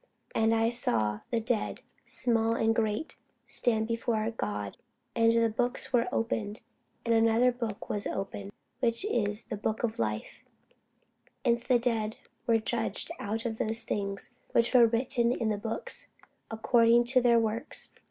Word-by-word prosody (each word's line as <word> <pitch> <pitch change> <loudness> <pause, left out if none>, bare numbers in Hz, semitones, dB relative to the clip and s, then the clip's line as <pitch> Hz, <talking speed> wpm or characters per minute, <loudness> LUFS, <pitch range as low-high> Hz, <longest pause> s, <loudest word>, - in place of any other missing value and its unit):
And 225 0 +2
I 225 0 +2
saw 110 - +1
the 235 - 0
dead, 230 -1 -2 0.3
small 230 -2 +3
and 225 -1 +2
great, 220 +5 -2 0.3
stand 220 -2 +1
before 230 -1 -1
God; 105 - -5 0.4
and 230 -1 +4
the 230 0 +3
books 245 +4 -1
were 245 0 +2
opened: 220 -2 -3 0.4
and 230 - +2
another 230 +2 +3
book 230 -4 -6
was 205 - 0
opened, 195 0 -5 0.3
which 230 - 0
is 210 - 0
the 215 - -6
book 215 +2 -3
of 225 -2 -2
life: 110 -1 -4 1.0
and 235 0 +3
the 245 +1 +2
dead 230 -1 -1 0.3
were 230 -1 +4
judged 225 +7 0
out 220 +3 -4
of 225 -2 -4
those 225 -1 +3
things 200 -1 -3 0.2
which 235 +2 +3
were 240 -2 +7
written 235 +1 +1
in 230 -3 -2
the 210 - -1
books, 225 - 0 0.4
according 230 +1 +3
to 255 +1 +3
their 240 -1 +4
works. 225 +4 +1
225 Hz, 150 wpm, -29 LUFS, 215-235 Hz, 1.0 s, were